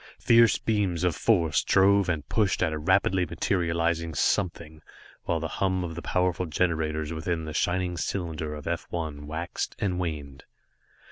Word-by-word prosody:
Fierce 115 -2 +5
beams 100 -6 0
of 90 -2 +1
force 85 - +2
drove 100 0 +4
and 75 -4 -2
pushed 105 -4 +1
at 80 -3 0
a - - -2
rapidly 95 +3 +2
materializing 85 -1 -1
something, 80 -5 -1 0.4
while 85 - 0
the 80 - -3
hum 95 +2 -1
of 85 -2 -4
the 85 - -6
powerful 90 0 0
generators 80 -1 -1
within 80 0 -2
the 80 - -6
shining 90 +2 0
cylinder 80 -4 -3
of 75 - -9
F 85 0 -3
1 75 -4 -5
waxed 80 +3 -4
and 90 -3 -1
waned. 75 -5 -5
85 Hz, 155 wpm, -27 LUFS, 80-90 Hz, 0.4 s, Fierce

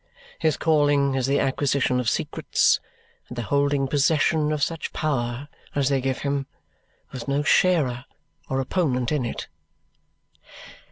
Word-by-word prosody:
His 155 -2 +1
calling 145 -3 +3
is 130 -1 0
the 140 - +2
acquisition 135 -1 +1
of 120 -2 +1
secrets - - +1 0.5
and 125 - -8
the 120 - -2
holding 140 +2 +1
possession 150 +2 +2
of 150 -2 -1
such 165 0 -3
power 130 -3 -2 0.3
as 140 -2 +2
they 135 -2 +1
give 130 0 -2
him, 140 -1 -1 0.6
with 130 -1 -7
no 140 +1 +1
sharer 145 -8 +2 0.4
or 135 - 0
opponent 130 -3 0
in 145 -5 0
it." 120 - -5
140 Hz, 135 wpm, -24 LUFS, 130-150 Hz, 0.6 s, calling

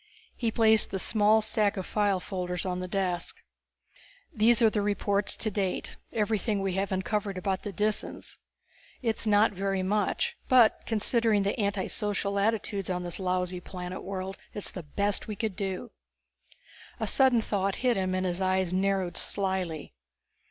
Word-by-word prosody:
He 235 - 0
placed 220 -1 +4
the 195 - -2
small 215 +2 +3
stack 215 -1 +1
of 190 - -3
file 205 -3 +1
folders 180 -1 -3
on 180 -1 -2
the 185 - -4
desk. 185 - -1 1.0
"These 225 +1 +4
are 225 - +7
the 210 - 0
reports 205 0 0
to 215 - 0
date, 195 -2 -2 0.2
everything 215 -1 0
we 195 -1 -1
have 195 +1 -1
uncovered 195 +1 -1
about 190 +1 -1
the 205 - -5
Disans. 210 +3 -2 0.6
It's 225 -1 0
not 210 +1 +5
very 195 -1 -1
much; 205 +1 0
but 245 -4 +5
considering 225 -1 +2
the 200 +5 -1
anti 200 -2 0
social 200 -1 -1
attitudes 205 -2 0
on 180 -1 -1
this 175 +1 -3
lousy 180 -1 -1
world 185 +1 -6 0.2
it - - -6
is 205 - -3
the 180 - -6
best 200 +6 -1
we 215 - -4
could 215 -1 -2
do." 195 +4 -4 1.1
A - - 0
sudden 260 -3 +4
thought 200 -3 -1
hit 245 -2 +4
him, 185 -1 0
and 185 0 0
his 180 +1 -1
eyes 185 -1 +1
narrowed 190 -1 0
slyly. 190 -5 -2
200 Hz, 160 wpm, -28 LUFS, 185-215 Hz, 1.1 s, are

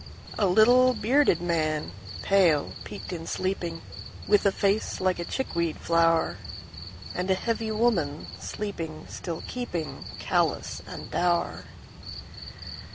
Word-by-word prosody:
A 205 - +4
little, 245 +6 +6
bearded 245 - +3
man, 155 - 0 0.3
pale, 175 -7 +3
peaked - - -7
in 165 -1 -6
sleeping, 175 -3 -2 0.4
With 205 -1 +4
a - - +4
face 200 +2 0
like 185 -1 +1
a - - -1
chickweed 170 - -2
flower. 165 -1 +2 0.8
And 180 +1 -2
a 190 - +4
heavy 225 +2 -1
woman, 210 -10 +1
sleeping 165 -7 -5
still 170 -3 -5
keepingCallous 175 -11 -2
and - - -8
dour. 175 -1 0
180 Hz, 110 wpm, -27 LUFS, 165-215 Hz, 0.8 s, little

